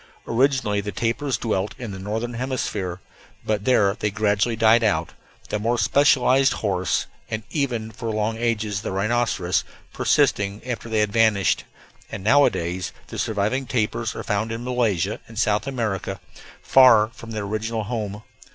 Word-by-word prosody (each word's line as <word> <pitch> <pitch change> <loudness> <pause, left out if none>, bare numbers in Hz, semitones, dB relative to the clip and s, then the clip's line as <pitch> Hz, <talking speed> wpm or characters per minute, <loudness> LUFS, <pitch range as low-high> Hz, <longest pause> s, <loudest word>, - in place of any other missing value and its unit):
Originally 120 -4 +1
the 105 +1 -5
tapirs 115 +6 -1
dwelt 105 -3 -2
in 120 -5 -6
the 95 - -7
northern 110 +5 -3
hemisphere, 115 -7 -3 0.5
but 105 -2 -1
there 100 -6 +3
they 105 - 0
gradually 105 +2 +1
died 115 +1 +4
out, 85 -7 +1 0.4
the 105 - -1
more 115 +3 0
specialized 135 0 +4
horse, 95 -4 -1 0.2
and 110 0 -3
even 120 -7 -2
for 115 +1 -5
long 110 +1 -1
ages 110 -3 -1
the - - -4
rhinoceros, 100 -2 0 0.3
persisting 100 0 +1
after 120 -2 -4
they 110 -1 +2
had 105 -1 0
vanished; 110 -4 +3 0.5
and 95 - -6
nowadays 95 -8 +2 0.2
the - - -6
surviving 110 +5 -1
tapirs 115 -1 -1
are - - -5
found 110 +1 -1
in 115 +1 -4
Malaysia 110 -6 0
and 115 - -13
South 105 +1 +1
America, 105 -7 -3 0.4
far 115 -5 +6
from 115 -1 -11
their 110 -2 -4
original 110 +2 -2
home. 105 -1 -4
110 Hz, 150 wpm, -23 LUFS, 105-120 Hz, 0.5 s, far